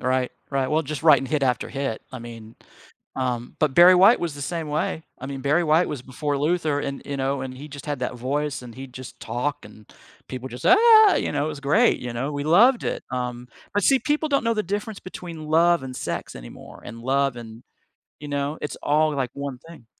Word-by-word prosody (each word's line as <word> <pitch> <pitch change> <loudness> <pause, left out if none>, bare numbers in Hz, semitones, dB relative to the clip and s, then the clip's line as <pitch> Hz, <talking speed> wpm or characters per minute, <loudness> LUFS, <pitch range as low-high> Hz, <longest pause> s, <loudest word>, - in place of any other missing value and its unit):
Right, 130 0 0 0.2
right. 135 -2 0
Well, 155 +1 +1
just 150 +1 -5
writing 155 -4 +5
hit 145 +1 -1
after 125 -2 0
hit. 135 -5 -4
I 130 - -6
mean, 115 -1 -11 0.6
um, 125 -2 -3
but 150 -4 +1
Barry 175 +1 +8
White 195 +6 +6
was 165 -4 -3
the 145 - -7
same 165 -1 -4
way. 155 +2 -2 0.2
I 130 - -7
mean, 135 -1 -6
Barry 150 +6 +2
White 160 +3 +3
was 145 -5 -5
before 145 +3 -3
Luther 155 -1 0
and, 140 -1 -5
you 140 - -3
know, 135 0 -1
and 130 -1 -6
he 145 - -9
just 145 0 -10
had 145 -3 -2
that 125 - -2
voice, 135 +3 -2
and 120 -2 -10
he'd 130 -1 -10
just 130 0 -10
talk, 135 +4 -3
and 105 0 -15 0.4
people 130 0 -6
just, 125 -1 -6
"Ah!" 435 +2 +7
You - - -1
know, 145 - 0
it - - -2
was 150 -2 -6
great, 160 - +3
you 125 -1 -6
know, 130 +5 -3
we 145 -1 -4
loved 230 - +5
it, - - -2
um, 125 -1 -4 0.2
but 205 - 0
see, 270 +6 +4
people 300 +3 -1
don't 280 -3 +1
know 230 - +2
the 215 - 0
difference 205 +3 -4
between 170 -4 -8
love 170 +1 +4
and 130 -1 -7
sex - - -5
anymore, - - -12
and 115 - -9
love, 135 +1 0
and, 115 0 -10 0.6
you 150 - -9
know, 145 +1 -2
it's 150 - -5
all 155 +1 +2
like 130 -3 -2
one 140 -2 -6
thing. 155 -9 -14
145 Hz, 225 wpm, -24 LUFS, 130-165 Hz, 0.6 s, Barry